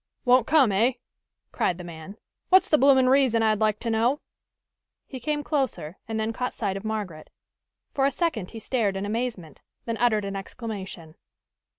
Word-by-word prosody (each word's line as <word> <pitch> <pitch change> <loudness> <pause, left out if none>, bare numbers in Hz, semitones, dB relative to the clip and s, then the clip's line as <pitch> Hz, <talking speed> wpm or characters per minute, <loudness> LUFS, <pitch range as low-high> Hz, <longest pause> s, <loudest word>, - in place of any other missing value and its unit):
"Won't 250 -1 +4
come, 280 -9 +4
eh?" 225 +7 +2 0.6
cried 175 - 0
the 180 - -8
man. 170 +4 -10 0.3
"What's 375 +1 +5
the 305 - +4
bloomin' 265 -1 +5
reason, 255 -4 +3
I'd 215 -1 +2
like 215 -1 +1
to 230 - -2
know?" 235 +6 +1 0.8
He 260 - -8
came 295 +4 -2
closer 265 - -2
and 220 -1 -3
then 220 +1 -1
caught 250 +2 -3
sight 200 -4 -2
of 195 - -6
Margaret. 205 -8 -5 0.6
For 275 -1 +2
a - - +3
second 270 - -2
he 230 - -10
stared 215 -4 -1
in 195 - -3
amazement; 210 - -4 0.2
then 230 -1 -3
uttered 215 -4 +2
an 195 0 -4
exclamation. 195 -5 -7
225 Hz, 175 wpm, -25 LUFS, 195-255 Hz, 0.8 s, What's